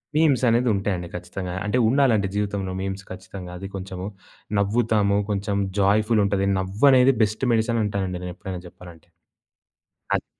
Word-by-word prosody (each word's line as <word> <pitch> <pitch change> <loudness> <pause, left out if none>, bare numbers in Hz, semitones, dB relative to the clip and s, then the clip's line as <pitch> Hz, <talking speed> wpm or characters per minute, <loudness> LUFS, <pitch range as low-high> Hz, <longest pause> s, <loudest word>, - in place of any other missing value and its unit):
మీమ్సనేది 125 -6 +3
ఉంటాయండి 95 -3 -2
ఖచ్చితంగా. 90 +1 -5
అంటే 105 +4 0
ఉండాలండి 120 -6 +3
జీవితంలో 100 -2 -2
మీమ్స్ 95 +1 -4
ఖచ్చితంగా. 95 -1 -8
అది 95 +2 -6
కొంచెము 95 0 -6 0.5
నవ్వుతాము. 105 -1 +2
కొంచెం 100 0 -1 0.2
జాయ్‌ఫులుంటది. 100 -1 +2
నవ్వనేది 125 +8 +4
బెస్ట్ 110 +4 +1
మెడిసిన్ 115 +1 +1
అంటానండి 95 -3 -2
నేనెప్పుడైనా 90 0 -6
జెప్పాలంటే. 85 -2 -14 1.1
అది - - -2
100 Hz, 115 wpm, -24 LUFS, 95-110 Hz, 1.1 s, నవ్వనేది